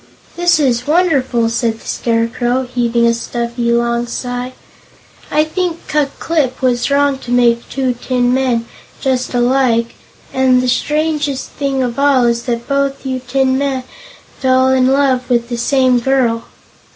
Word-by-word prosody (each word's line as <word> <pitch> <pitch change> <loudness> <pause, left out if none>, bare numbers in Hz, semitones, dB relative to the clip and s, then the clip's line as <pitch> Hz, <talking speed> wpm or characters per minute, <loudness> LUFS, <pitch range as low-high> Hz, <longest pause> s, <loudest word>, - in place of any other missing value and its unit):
"This 345 -1 +2
is 245 -3 +1
wonderful!" 280 -8 +2
said 230 -1 -1
the - - -17
Scarecrow, 240 +2 0
heaving 240 -2 0
a 235 - +3
stuffy, 235 0 -2
long 235 0 0
sigh. 245 +1 -4 0.8
"I 300 +1 +2
think 335 +2 -2
Ku 300 -2 +1
Klip 290 -6 -1
was 250 -1 +1
wrong 280 -1 +2
to 245 - -11
make 240 -1 +2
two 260 -2 -1
tin 245 0 0
men, 250 -3 0 0.3
just 255 -1 -1
alike, 240 -2 +2 0.4
and 260 -1 +3
the 255 - -1
strangest 295 +1 -1
thing 275 -2 -1
of 245 +1 -3
all 275 -3 +4
is 235 0 0
that 235 -1 -3
both 275 -1 -1
you 260 -1 -2
tin 260 +1 0
men 270 -2 -1 0.6
fell 260 0 +3
in 260 -1 +3
love 265 -2 +1
with 235 -1 +1
the 240 - -3
same 255 0 +2
girl." 240 -2 +1
255 Hz, 150 wpm, -16 LUFS, 240-275 Hz, 0.8 s, all